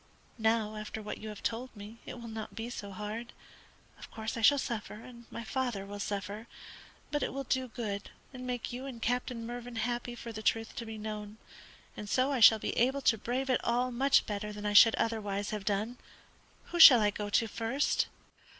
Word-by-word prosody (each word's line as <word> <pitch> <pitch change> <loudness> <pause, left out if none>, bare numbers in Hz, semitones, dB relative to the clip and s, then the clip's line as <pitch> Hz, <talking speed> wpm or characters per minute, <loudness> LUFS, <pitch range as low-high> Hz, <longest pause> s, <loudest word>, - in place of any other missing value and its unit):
Now 220 -1 +1
after 215 +1 -6
what 210 -1 -6
you 215 - -7
have 210 -1 -9
told 245 +2 -3
me 210 +3 -10
it 250 - -7
will 235 - -8
not 220 -1 -7
be 225 +2 -5
so 205 -4 -6
hard. 210 +4 -6 0.7
Of - - -10
course 220 +2 -5
I 230 - -3
shall 285 +6 +6
suffer, 235 -6 -3
and 235 +2 -12
my 230 - -6
father 240 -5 -2
will 205 +1 -7
suffer; 205 +2 -4 0.6
but 295 0 0
it - - -1
will 275 0 -4
do 260 0 0
good 210 -4 -4 0.2
and 255 -1 -7
make 245 -1 -3
you 255 +2 -5
and 250 -4 -7
Captain 245 0 -1
Mervyn 240 0 -6
happy 240 +2 -2
for 235 0 -7
the 215 -1 -6
truth 225 0 0
to 230 - -5
be 220 0 -6
known, 210 0 -6 0.6
and 210 - -7
so 260 +5 +2
I 270 - 0
shall 220 -1 +9
be - - -3
able 265 +4 +2
to 230 -4 +3
brave 255 +4 -1
it 250 - +1
all 245 +2 +1
much 265 +3 +3
better 210 0 -4
than 210 0 -7
I 205 - 0
should 225 +2 +8
otherwise 205 -3 -1
have 210 -2 -4
done. 215 +5 -1 0.7
Who 345 - -2
shall 265 -7 +12
I 210 -1 +3
go 205 0 -4
to 225 +2 +2
first?" 230 +6 0
225 Hz, 210 wpm, -31 LUFS, 210-245 Hz, 0.7 s, shall